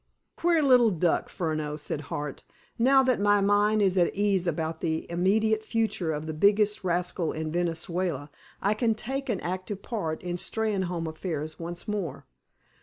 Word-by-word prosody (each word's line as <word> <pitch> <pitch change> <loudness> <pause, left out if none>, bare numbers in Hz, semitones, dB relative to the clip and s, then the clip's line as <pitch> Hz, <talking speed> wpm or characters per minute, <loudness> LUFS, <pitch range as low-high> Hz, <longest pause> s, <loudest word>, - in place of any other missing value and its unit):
"Queer 335 -2 +2
little 250 -4 +6
duck, 175 -3 +1
Furneaux," 155 -3 -2
said 150 0 -3
Hart. 145 -2 -4 0.4
"Now 265 +3 +5
that 255 -4 +2
my 205 0 +4
mind 205 +1 +3
is 190 -1 +3
at 175 - +2
ease 200 -3 +1
about 160 0 -2
the 160 -1 -1
immediate 215 +5 +2
future 220 -7 -1
of 150 0 -3
the 155 - -4
biggest 205 +5 +3
rascal 175 -1 0
in 155 0 -4
Venezuela 170 -3 -2 0.3
I 205 - +3
can 225 0 +1
take 270 +5 -4
an 210 -6 0
active 185 +3 -4
part 165 -9 -3
in 175 0 -3
Steynholme 190 -5 -1
affairs 155 -1 -4
once 175 +4 -6
more. 170 -10 -3
185 Hz, 160 wpm, -27 LUFS, 160-215 Hz, 0.4 s, little